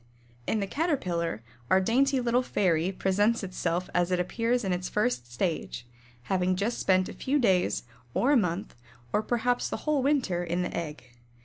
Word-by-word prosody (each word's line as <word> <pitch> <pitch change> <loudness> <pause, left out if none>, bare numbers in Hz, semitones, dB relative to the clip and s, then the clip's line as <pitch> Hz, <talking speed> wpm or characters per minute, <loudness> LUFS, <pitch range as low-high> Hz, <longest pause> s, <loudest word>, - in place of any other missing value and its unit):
In 220 - +1
the - - 0
Caterpillar 180 - -1 0.3
our 190 - +5
dainty 265 +7 +2
little 245 0 +2
fairy 180 -7 +1
presents 205 +4 +1
itself 180 -1 -2
as 175 0 +2
it 180 -1 +1
appears 230 +7 0
in 190 -2 0
its 180 0 -3
first 125 - -1
stage, 140 -3 -2 0.4
having 185 +3 +1
just 205 +6 -1
spent 185 -1 +3
a - - -7
few 280 +2 0
days, 185 - +2 0.3
or 265 - +3
a - - +5
month, 185 -4 0 0.4
or 210 - +3
perhaps 245 +2 0
the - - -3
whole 305 -3 +2
winter 255 -11 +1
in 175 +1 -1
the - - -4
egg. 155 -3 -4
190 Hz, 175 wpm, -28 LUFS, 175-240 Hz, 0.4 s, our